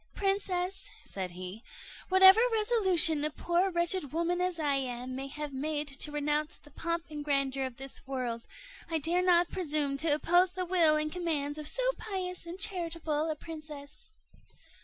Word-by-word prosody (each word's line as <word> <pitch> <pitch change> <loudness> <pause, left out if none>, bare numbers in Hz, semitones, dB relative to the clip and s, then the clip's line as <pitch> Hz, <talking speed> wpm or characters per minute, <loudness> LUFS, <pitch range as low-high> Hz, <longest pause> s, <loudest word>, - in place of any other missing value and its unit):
"Princess," 385 -1 -2
said 185 -2 -6
he, 185 +4 -7 0.5
"whatever 380 +2 +8
resolution 380 -9 +3
a 305 - +3
poor 345 +5 0
wretched 345 -3 0
woman 340 +3 -1
as 365 -1 -1
I 295 -3 0
am 255 -1 -4
may 270 +1 -5
have 295 +1 -6
made 295 +2 -2
to 280 +2 -2
renounce 295 +1 -1
the 295 - -19
pomp 335 +3 -3
and 295 -1 -5
grandeur 275 -2 0
of 255 -2 -7
this 270 0 -8
world, 245 -4 -4 0.4
I 325 - 0
dare 335 +4 +1
not 350 -1 +3
presume 300 -6 -1
to 320 +3 +1
oppose 350 +5 +3
the 365 0 -2
will 340 -4 +5
and 305 0 -1
commands 305 -4 -2
of 300 - -3
so - - +2 0.2
pious 365 -4 -5
and 345 +2 -6
charitable 330 -5 -1
a 310 - -2
princess." 300 0 -10
315 Hz, 165 wpm, -30 LUFS, 285-360 Hz, 0.5 s, whatever